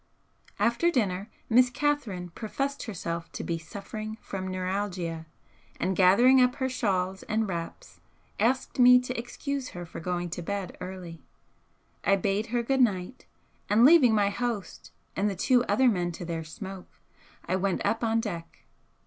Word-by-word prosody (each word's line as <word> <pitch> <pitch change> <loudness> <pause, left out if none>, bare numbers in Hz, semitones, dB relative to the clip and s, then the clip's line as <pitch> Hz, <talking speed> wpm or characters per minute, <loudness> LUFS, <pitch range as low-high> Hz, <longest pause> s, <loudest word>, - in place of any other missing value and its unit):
After 235 +9 +2
dinner, 205 - -1 0.2
Miss 250 +2 +5
Catherine 240 - -1
professed 275 +8 -4
herself 170 -5 -4
to - - -5
be 165 -1 -2
suffering 215 +6 -7
from 190 -1 -5
neuralgia, 185 -3 -3 0.5
and 185 +2 0
gathering 235 +9 +6
up 250 0 +3
her 260 - -1
shawls 190 -7 -1
and 220 0 +1
wraps 175 - -6 0.4
asked 255 +4 0
me 250 0 +8
to 250 0 -5
excuse 265 +3 -4
her 175 - -5
for 165 - -9
going 175 0 -3
to 175 - -4
bed 200 +1 -4
early. 180 -3 -7 0.8
I 195 - +4
bade 200 +3 -1
her 240 +1 -1
good 265 +2 +1
night, 205 0 0 0.4
and, 220 +4 +6
leaving 275 -7 +7
my 200 -1 +2
host 230 -2 -4 0.2
and 200 +2 +1
the 195 - -3
two 245 +6 +3
other 260 - +3
men 180 -6 +1
to 175 - -7
their 165 -1 -3
smoke, 190 +4 -9 0.5
I - - 0
went 190 0 -1
up 230 +1 0
on 225 0 +2
deck. 170 -7 -7
200 Hz, 155 wpm, -28 LUFS, 180-245 Hz, 0.8 s, me